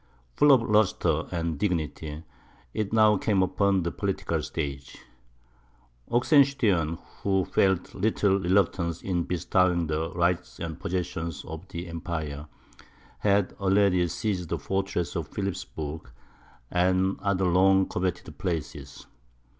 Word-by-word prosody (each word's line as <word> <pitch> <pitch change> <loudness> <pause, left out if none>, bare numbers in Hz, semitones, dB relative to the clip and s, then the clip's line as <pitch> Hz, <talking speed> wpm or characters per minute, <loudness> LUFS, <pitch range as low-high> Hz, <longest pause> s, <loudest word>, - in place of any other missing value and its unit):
Full 145 - +5
of 130 -4 +6
lustre 90 -7 +2
and 85 -3 -2
dignity, 80 -4 -2 0.5
it 105 -2 -2
now 110 -2 +5
came 100 -2 +2
upon 95 0 +1
the 85 - -2
political 95 -5 -2
stage. 70 -4 -5 1.1
Oxenstiern, 120 - +3 0.2
who 95 -2 +1
felt 95 -2 +1
little 100 -1 +1
reluctance 85 -3 +1
in 90 -3 -1
bestowing 90 0 +1
the 80 +1 -2
rights 85 0 0
and 80 -2 -5
possessions 85 -3 -3
of 80 +4 -8
the 85 0 -6
empire, 80 -3 -5 0.7
had 100 -2 +2
already 95 -2 +3
ceded 90 -1 -3
the - - -1
fortress 95 -4 -2
of - - -2
Philipsburg, 80 -7 -5 0.6
and 95 +2 +2
the - - -20
other 100 -2 +1
long 95 +2 +4
coveted 90 0 -3
places. 85 -5 -4
90 Hz, 120 wpm, -27 LUFS, 85-100 Hz, 1.1 s, of